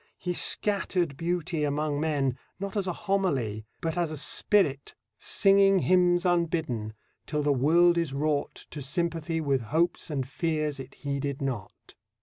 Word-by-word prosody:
He 180 -1 -3
scattered 180 -5 +1
beauty 165 0 -2
among 145 0 -1
men 145 -5 0 0.2
not 195 +1 -5
as 200 -2 -1
a - - 0
homily 135 - 0
but 165 +1 -2
as 170 -2 0
a 155 - -5
spirit 150 -2 +1 0.2
Singing 195 0 +4
hymns 180 0 +3
unbidden, 160 -11 0 0.3
till 150 -1 -1
the 145 0 +3
world 170 +6 +4
is 165 -4 -1
wrought 145 +1 -2
To 150 - -6
sympathy 165 +3 -1
with 140 -4 0
hopes 170 +2 0
and 135 -4 -2
fears 155 -1 -2
it 135 0 -9
heeded 140 -1 -3
not. 125 -9 -6
155 Hz, 145 wpm, -27 LUFS, 140-175 Hz, 0.3 s, Singing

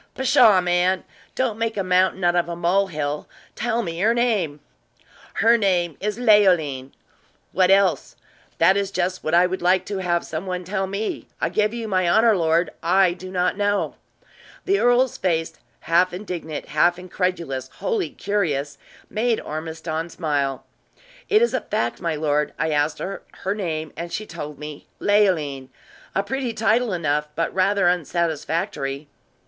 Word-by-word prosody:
"Pshaw, 225 -7 +5
man! 180 +1 +1 0.3
don't 235 -4 -1
make 230 -1 -1
a 195 - 0
mountain 185 0 +2
out 175 0 +3
of 175 -1 +1
a 170 - -3
mole 180 +4 +2
hill! 150 -3 -3 0.3
Tell 235 +1 -1
me 165 -1 -5
her 225 +5 +3
name!" 205 -12 0 0.8
"Her 230 +2 +4
name 175 -6 +1
is 210 +1 -2
Leoline." 180 - +3 0.6
"What 185 -1 +3
else?" 195 0 +3 0.4
"That 190 - +5
is 200 -1 0
just 185 -1 -2
what 155 +2 +1
I 175 +1 +6
would 185 +1 -3
like 180 +1 +3
to 200 -2 -4
have 175 -2 0
some 165 +4 -5
one 180 -1 -3
tell 190 +1 -2
me. 200 +3 -4
I - - 0
give 210 0 +1
you 230 -1 -5
my 185 -4 +1
honor, 220 +5 +5
my 195 - 0
lord, 165 +1 +2
I 185 +1 +3
do 185 +1 -10
not 180 0 0
know." 205 0 0 0.7
The 395 +1 +2
earl's 245 +1 +3
face, 165 -3 0 0.3
half 175 +2 +2
indignant, 175 -5 -6
half 175 +4 +3
incredulous, 175 -7 -3
wholly 450 -6 -1
curious, 150 -9 -2 0.3
made 225 +2 0
Ormiston 160 +1 -5
smile. 145 -6 -2 0.6
"It 425 +2 +5
is 475 - +1
a - - 0
fact, - - -2
my 165 -3 -1
lord. 150 -1 0
I 160 - 0
asked 150 +1 +1
her 195 - -5 0.2
her 195 - 0
name, 160 -7 -4
and 170 0 -6
she 215 - -4
told 150 -6 -7
me 150 -1 -9
Leoline 160 -11 +1 0.5
a 195 - +1
pretty 255 +2 -3
title 225 +1 +1
enough, 150 -4 0
but 165 - -1
rather 195 0 +2
unsatisfactory." 160 -4 -1
180 Hz, 165 wpm, -22 LUFS, 160-205 Hz, 0.8 s, I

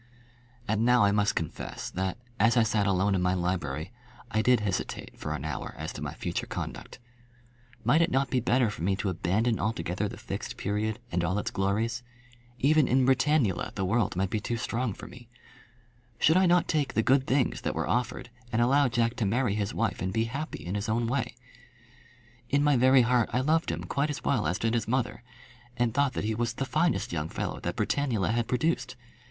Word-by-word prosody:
And 110 +1 +1
now 125 -1 +5
I 100 - +4
must 105 0 +2
confess 80 - -4
that, 95 +2 -2 0.2
as 115 +4 +4
I 115 - +6
sat 105 -2 +1
alone 100 +1 +2
in 95 - +1
my 90 +1 +2
library, 85 -3 -2 0.4
I 110 - +2
did 125 -1 +4
hesitate 100 -3 -3
for - - -4
an 70 - -6
hour 75 -4 -5
as - - -5
to - - -8
my - - -4
future - - -3
conduct. - - -6 0.9
Might 140 +9 +4
it 170 - +3
not 135 -3 0
be 130 - +2
better 120 -1 +2
for 105 - -8
me 95 +3 +1
to 100 0 -2
abandon 100 +6 0
altogether 100 -1 -1
the - - -8
Fixed - - -6
Period 105 +2 -1
and 85 0 0
all 90 +4 0
its 105 - -2
glories? 110 +5 0 0.6
Even 150 +2 +4
in 130 +1 +3
Britannula 130 - +2
the 95 - -1
world 105 0 +1
might 95 +1 -1
be 110 - 0
too 120 +3 -3
strong 115 -2 -2
for - - -10
me. 120 -1 -13 0.9
Should 160 - +4
I 185 0 +5
not 175 0 +4
take 150 -3 0
the 110 - +3
good 135 +2 +3
things 130 -1 +1
that - - -2
were - - -1
offered, 125 0 -1 0.2
and 110 - +1
allow 135 +4 +4
Jack 115 0 +1
to 115 - 0
marry 115 +1 +1
his 105 0 -1
wife 110 -3 -1
and 95 - -1
be 110 +3 +1
happy 135 - -5
in 90 - -3
his 105 +1 -2
own 115 +2 +1
way? 125 +2 -1 1.1
In 145 +1 +2
my 145 -1 +4
very 130 +1 +6
heart 120 -1 +2
I 125 +2 +1
loved 160 +4 +1
him - - -3
quite 140 +2 -1
as 145 - -4
well 120 - +1
as 90 +3 0
did 115 0 0
his 115 -2 0
mother, 125 +1 -1 0.6
and 120 -2 +1
thought 140 0 +2
that - - -3
he 110 +1 0
was 120 +1 -1
the 135 - -3
finest 155 - 0
young 80 -1 -2
fellow - - -4
that - - -3
Britannula 120 -9 0
had 115 0 0
produced. 125 -2 0
115 Hz, 210 wpm, -28 LUFS, 100-130 Hz, 1.1 s, I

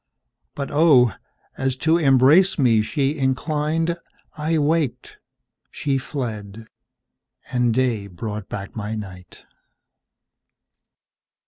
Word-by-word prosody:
But, 140 -1 -5
oh! 145 -6 +5 0.5
as 135 -1 0
to 160 +5 +2
embrace 145 +6 +5
me 120 -7 +4
she 140 +6 -1
inclined,I 155 +3 -2
waked, 155 -2 -1 0.5
she 135 -2 -1
fled, 110 -6 -6 0.9
and 125 -2 +2
day 115 -4 0
brought 105 +2 -6
back 100 -1 -7
my 110 0 -4
night. 95 -4 -10
130 Hz, 90 wpm, -22 LUFS, 110-150 Hz, 0.9 s, oh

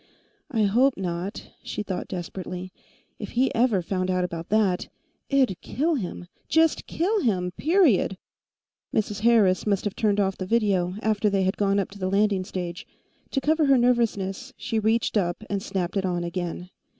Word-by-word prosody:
I 225 -4 +1
hope 245 +7 +3
not! 180 +1 -4
she - - -4
thought 190 -3 -4
desperately. 185 0 -6 0.5
If - - -7
he 255 +2 +2
ever 225 -6 +2
found 185 +1 -2
out 185 -1 +1
about 170 -2 -5
that, 200 -4 +2 0.4
it'd 260 -9 +2
kill 320 +5 0
him. 185 - -4 0.2
Just 320 -1 +3
kill 405 +6 0
him, 180 -7 0
period! 300 - +3 0.7
Mrs. 210 -1 -1
Harris 215 -4 +3
must 200 -2 +1
have 205 - -2
turned 210 -4 +1
off 195 -1 0
the 185 - -4
video, 195 -5 +1
after 215 -1 +2
they 195 -1 +1
had 190 +1 +1
gone 200 -1 +1
up 195 - -1
to 200 - -12
the 185 -1 -1
landing 200 -1 +2
stage. 180 -1 -5 0.4
To 270 - -1
cover 310 +2 +2
her 275 -1 +6
nervousness, 240 -1 0
she 230 -3 -1
reached 220 +1 +1
up 175 +1 -1
and 200 -1 -1
snapped 190 -3 -3
it 195 - +1
on 175 -2 -1
again. 175 +1 -4
200 Hz, 175 wpm, -25 LUFS, 185-235 Hz, 0.7 s, her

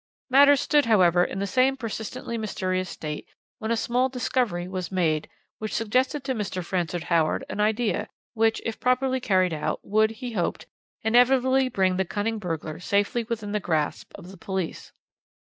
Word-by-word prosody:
"Matters 280 +1 +7
stood, 295 -1 +3
however, 180 -5 +5
in 190 - -3
the 200 - -1
same 255 +7 +2
persistently 230 0 -5
mysterious 185 -4 -2
state 150 -1 -6 0.3
when 220 - -4
a 230 - +1
small 250 +3 +1
discovery 245 -8 -1
was 185 -1 -4
made, 160 -5 0 0.3
which 215 0 -4
suggested 255 +6 0
to 265 - -1
Mr. 195 -6 -4
Francis 175 -2 -2
Howard 165 -3 +1
an - - -5
idea, 215 0 0 0.2
which, 225 -1 +1
if 225 - -3
properly 255 +1 +1
carried 185 -7 +2
out, 150 - -2
would, 215 +1 +3
he 245 +2 -6
hoped, 185 -6 -2 0.4
inevitably 255 +3 +4
bring 190 -5 +1
the 190 - +2
cunning 215 +4 -2
burglar 165 -4 -4
safely 205 +5 0
within 215 -2 -4
the 210 - 0
grasp 160 -5 -2
of 180 - -11
the 195 - -12
police. 190 -1 -4
210 Hz, 165 wpm, -25 LUFS, 185-245 Hz, 0.4 s, Matters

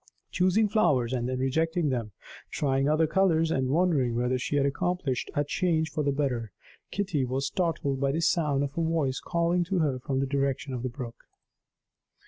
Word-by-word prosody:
Choosing 185 +4 +3
flowers 140 - +2
and 125 -1 -1
then 130 - -2
rejecting 160 +5 0
them, 120 -5 -2 0.4
trying 135 -1 0
other 155 +1 +3
colors 165 -2 +2
and 130 -4 0
wondering 145 -6 +2
whether 125 +1 0
she 135 - -2
had 140 -1 +3
accomplished 150 -2 -1
a 145 - +2
change 160 0 0
for 155 - -1
the 140 - +1
better, 130 -6 -1 0.4
Kitty 190 -9 -1
was 130 +2 -1
startled 160 -7 -1
by 140 0 +1
the 160 +4 -1
sound 150 -4 +2
of 140 0 -4
a 170 - 0
voice 160 -5 0
calling 170 +1 +1
to 190 +2 -1
her 145 -6 +1
from 135 0 -2
the 135 - +1
direction 140 0 -1
of 125 - -3
the 130 - -2
brook. 120 -2 -8
145 Hz, 185 wpm, -28 LUFS, 130-165 Hz, 0.4 s, Choosing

